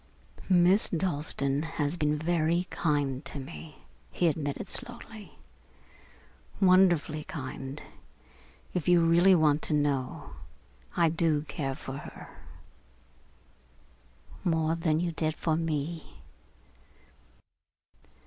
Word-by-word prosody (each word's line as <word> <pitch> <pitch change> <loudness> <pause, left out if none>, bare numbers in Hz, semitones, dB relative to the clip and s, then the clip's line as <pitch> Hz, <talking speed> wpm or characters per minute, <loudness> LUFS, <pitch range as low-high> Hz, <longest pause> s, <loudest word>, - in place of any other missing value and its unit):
"Miss 185 +3 +5
Dalstan 145 -5 0 0.2
has 145 +2 0
been 150 -2 0
very 170 +2 +1
kind 145 -4 -1
to 140 - -6
me," 150 +2 -10 0.3
he 175 - +1
admitted 150 +2 -2
slowly, 220 -6 -3 1.2
"wonderfully 180 -5 +4
kind. 135 -1 -7 0.9
If 180 -4 -2
you 175 -1 +5
really 170 +3 +5
want 155 -2 +3
to 155 - +1
know, 140 -3 -1 0.7
I 165 - +4
do 160 -2 +1
care 135 -3 -4
for 135 -1 -7
her." - - -10 2.1
"More 160 -2 +1
than 165 -2 0
you 175 0 -1
did 155 -1 -2
for 160 0 0
me?" 160 - -3
160 Hz, 100 wpm, -29 LUFS, 145-175 Hz, 2.1 s, Miss